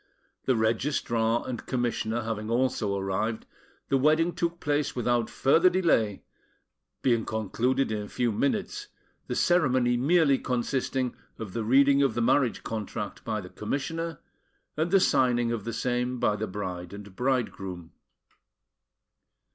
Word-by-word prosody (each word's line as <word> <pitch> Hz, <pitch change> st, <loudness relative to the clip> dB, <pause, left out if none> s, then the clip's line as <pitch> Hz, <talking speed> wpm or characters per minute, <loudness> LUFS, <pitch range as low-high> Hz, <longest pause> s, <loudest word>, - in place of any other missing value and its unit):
The 130 Hz, -, +3 dB
Registrar 115 Hz, 0 st, 0 dB
and 125 Hz, -2 st, -4 dB
Commissioner 120 Hz, -2 st, -1 dB
having 110 Hz, -1 st, -4 dB
also 115 Hz, -4 st, 0 dB
arrived, 100 Hz, +3 st, -2 dB, 0.4 s
the 135 Hz, -, +3 dB
wedding 155 Hz, +5 st, +3 dB
took 170 Hz, 0 st, -2 dB
place 145 Hz, 0 st, -1 dB
without 120 Hz, -2 st, +1 dB
further 165 Hz, +7 st, +4 dB
delay, 165 Hz, -, +1 dB, 0.8 s
being 120 Hz, -3 st, +3 dB
concluded 115 Hz, +4 st, 0 dB
in 105 Hz, -1 st, -2 dB
a 105 Hz, -, -7 dB
few 120 Hz, -2 st, 0 dB
minutes, 210 Hz, -, -1 dB, 0.4 s
the -, -, -3 dB
ceremony 130 Hz, -8 st, +3 dB
merely 145 Hz, +1 st, +3 dB
consisting 125 Hz, 0 st, -1 dB, 0.2 s
of 100 Hz, -5 st, -7 dB
the 115 Hz, -, -2 dB
reading 140 Hz, +4 st, +5 dB
of 140 Hz, -, +2 dB
the -, -, 0 dB
marriage 125 Hz, +1 st, +2 dB
contract 110 Hz, -1 st, -5 dB
by 110 Hz, -2 st, -2 dB
the 90 Hz, -, -10 dB
Commissioner, 160 Hz, -, -3 dB, 0.6 s
and 160 Hz, +3 st, 0 dB
the 195 Hz, +2 st, +5 dB
signing 120 Hz, -7 st, +2 dB
of 115 Hz, -4 st, -3 dB
the 115 Hz, -, -2 dB
same 125 Hz, +1 st, -1 dB
by 105 Hz, -, +2 dB
the 110 Hz, +1 st, -3 dB
bride 90 Hz, -2 st, -5 dB
and 100 Hz, -1 st, -10 dB
bridegroom. 95 Hz, -9 st, -2 dB
120 Hz, 140 wpm, -27 LUFS, 110-140 Hz, 0.8 s, reading